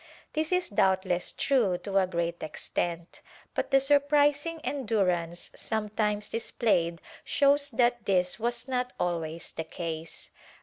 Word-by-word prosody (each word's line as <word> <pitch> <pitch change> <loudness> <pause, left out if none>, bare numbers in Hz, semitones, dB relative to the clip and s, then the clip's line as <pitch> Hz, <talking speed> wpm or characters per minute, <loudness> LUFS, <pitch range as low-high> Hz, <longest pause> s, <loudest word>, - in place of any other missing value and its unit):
This 310 +1 -1
is 365 0 +1
doubtless 190 -3 +1
true 230 -10 +2
to 195 -1 +2
a 190 - +2
great 170 -1 -2
extent, 165 +2 -3 0.3
but - - -2
the 270 - +5
surprising 290 +3 +3
endurance 185 - -1
sometimes 210 -1 -1
displayed 175 -7 0 0.2
shows 285 0 +3
that 240 -2 +1
this 185 0 +1
was 240 +2 -2
not 250 -1 -1
always 170 -2 -2
the 160 - -4
case. 160 0 -6
210 Hz, 125 wpm, -28 LUFS, 175-270 Hz, 0.3 s, the